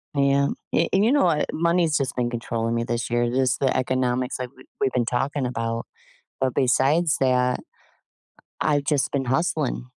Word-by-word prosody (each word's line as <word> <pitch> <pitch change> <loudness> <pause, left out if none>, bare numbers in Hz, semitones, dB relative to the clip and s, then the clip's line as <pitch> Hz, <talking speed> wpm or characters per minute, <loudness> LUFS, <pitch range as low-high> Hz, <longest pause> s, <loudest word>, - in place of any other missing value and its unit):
Yeah, 140 0 +3 0.3
a - - +2
and 195 - +4
you 230 - +3
know 290 - +4
what, 160 -4 +2
money's 170 -2 +2
just 140 -1 -2
been 120 -1 0
controlling 115 -1 -2
me 115 - 0
this 120 0 -3
year, 120 0 +1
just 130 0 +1
the 135 -2 +1
economics 130 0 0
like 125 -1 -5
we've 130 - -17
we've 135 - +1
been 125 -2 0
talking 130 +3 -1
about, 115 -1 -3 0.5
but 130 -1 +1
besides 145 +5 +2
that, 125 -1 +2 1.0
I've 145 -2 +1
just 145 -2 +1
been 135 -2 -1
hustling 135 -1 -1
130 Hz, 175 wpm, -24 LUFS, 125-145 Hz, 1.0 s, and